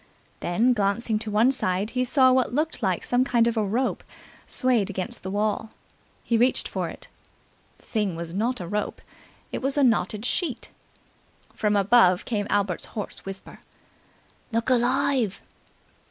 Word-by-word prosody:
Then, 225 +9 +2
glancing 215 +1 0
to 220 - -3
one 220 +5 +4
side, 200 -4 -1
he 250 +1 0
saw 260 0 +4
what 255 -1 +2
looked 300 +1 -1
like 190 -5 0
some 245 +1 +2
kind 235 -3 +2
of 235 - 0
a 220 - +1
rope 230 +6 -1 0.4
swayed 245 -7 +1
against 185 -2 -4
the 190 - -5
wall. 210 +2 -1 0.5
He 230 -2 +1
reached 250 +2 +2
for - - -3
it. - - -10 0.7
The - - -25
thing 210 -6 -1
was 165 0 -6
not 230 +6 -1
a 175 - -6
rope: 210 +3 -3 0.5
it - - -4
was 270 +2 0
a 285 - +4
knotted 215 -3 +1
sheet. 280 -3 -2 0.8
From 210 -1 0
above 195 -3 +4
came 205 -4 -2
Albert's 200 -4 0
hoarse 210 - -5
whisper. 195 0 -8 0.9
"Look 230 +3 0
alive!" 250 -3 +1
225 Hz, 155 wpm, -25 LUFS, 200-250 Hz, 0.9 s, one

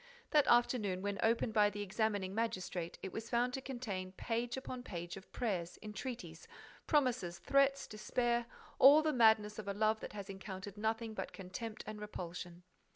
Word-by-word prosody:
That 300 -3 +5
afternoon, 215 -6 +3
when 200 -1 -2
opened 225 0 +2
by 210 -1 +5
the 205 0 -4
examining 205 -1 -1
magistrate, 185 -6 -2
it 190 - -5
was 220 +1 -5
found 245 +1 +1
to 265 - -3
contain 210 -9 -4
page 235 +4 -2
upon 255 -1 -5
page 175 -7 -6
of 195 0 -12
prayers, 180 -8 -2
entreaties, 210 -5 -6 0.4
promises, 250 - +2
threats, 275 +7 +3
despair, 235 +2 0 0.3
all 290 +4 +9
the 310 -1 +2
madness 220 -3 +4
of 210 - -6
a 200 - -2
love 215 +1 +2
that - - -7
has 200 -2 -6
encountered 190 0 -7
nothing 220 +1 -1
but - - -5
contempt 215 +4 -6
and 215 0 -7
repulsion. 175 -3 -6
215 Hz, 165 wpm, -36 LUFS, 190-240 Hz, 0.4 s, all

